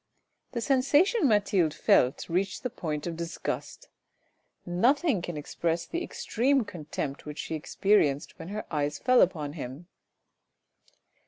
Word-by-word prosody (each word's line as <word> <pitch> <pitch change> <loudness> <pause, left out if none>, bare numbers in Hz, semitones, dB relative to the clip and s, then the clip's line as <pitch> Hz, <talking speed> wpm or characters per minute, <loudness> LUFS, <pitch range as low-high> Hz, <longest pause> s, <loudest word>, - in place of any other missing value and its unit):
The 235 - -2
sensation 290 - +3
Mathilde 195 - +2
felt 125 -3 +3
reached 185 +3 -1
the 250 - -2
point 155 -10 -4
of 170 -1 -3
disgust; 170 - -5 0.8
nothing 235 - +2
can 175 -2 -5
express 165 +3 -2
the 340 +1 -3
extreme 275 - 0
contempt 150 -6 -5
which 150 0 -6
she - - -4
experienced 155 -2 +1
when 165 - -7
her 210 +3 -5
eyes 145 -1 0
fell 255 0 +4
upon 155 -5 +1
him. 140 +1 -7
175 Hz, 130 wpm, -28 LUFS, 155-250 Hz, 0.8 s, fell